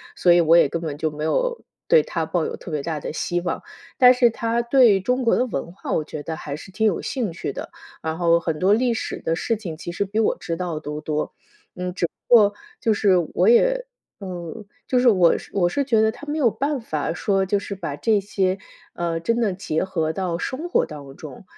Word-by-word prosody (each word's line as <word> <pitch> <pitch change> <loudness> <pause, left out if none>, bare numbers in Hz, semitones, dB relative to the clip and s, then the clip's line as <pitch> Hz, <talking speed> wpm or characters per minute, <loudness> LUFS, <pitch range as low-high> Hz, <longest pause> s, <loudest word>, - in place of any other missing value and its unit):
所 175 - +4
以 175 - +5
我 165 +1 +5
也 - - +6
根 165 - -3
本 150 -3 -4
就 155 +1 -1
没 150 0 -6
有 - - 0 0.2
对 480 -2 +6
他 - - -2
抱 - - -1
有 460 +1 -4
特 - - -10
别 150 -3 -3
大 155 -1 -3
的 - - -5
希 175 +2 -1
望。 180 - -3 0.3
但 250 -1 +8
是 245 -1 +4
他 230 +1 -1
对 235 -5 +5
中 250 +6 0
国 230 - +3
的 250 - +2
文 170 - -4
化 185 - -7
我 155 - +1
觉 150 0 -7
得 160 +2 -5
还 145 - -6
是 190 - -11
挺 220 +4 0
有 205 -6 +2
兴 235 -9 -2
趣 165 - -4
的， - - -7 0.3
然 160 0 -2
后 170 -1 +3
很 160 -2 -3
多 190 +4 +4
历 240 +1 +2
史 - - -4
的 165 - 0
事 230 +6 -1
情 180 -7 -6
其 175 +2 -7
实 200 +4 -1
比 210 +3 -2
我 225 - +2
知 165 - -4
道 170 -3 -3
都 150 0 -6
多。 150 0 -2 0.4
嗯， 180 0 -4
只 175 - 0
不 245 - -1
过 205 -3 +6 0.3
就 225 -3 +2
是 200 -2 +3 0.2
我 185 +4 +3
也 - - +4 0.4
嗯， 185 +2 -7 0.2
就 250 - +2
是 245 - +4
我 185 -6 +5 0.2
我 175 -3 +2
是 280 +10 -1
觉 230 -5 +2
得 220 0 +4
他 245 - -11
没 295 +2 -2
有 260 -6 +4
办 280 +3 -2
法 155 -6 -2
说， 195 +2 0
就 200 +2 +1
是 200 0 -5
把 165 -7 -5
这 210 +8 +2
些， 190 -1 0 0.4
呃， 170 -1 -2
真 230 +8 0
的 215 -4 +1
结 180 -4 -2
合 160 -4 -1
到 175 -1 -2
生 285 - -4
活 - - +2
当 140 -3 -10
中。 150 +2 -10
190 Hz, 255 characters per minute, -23 LUFS, 165-230 Hz, 0.4 s, 但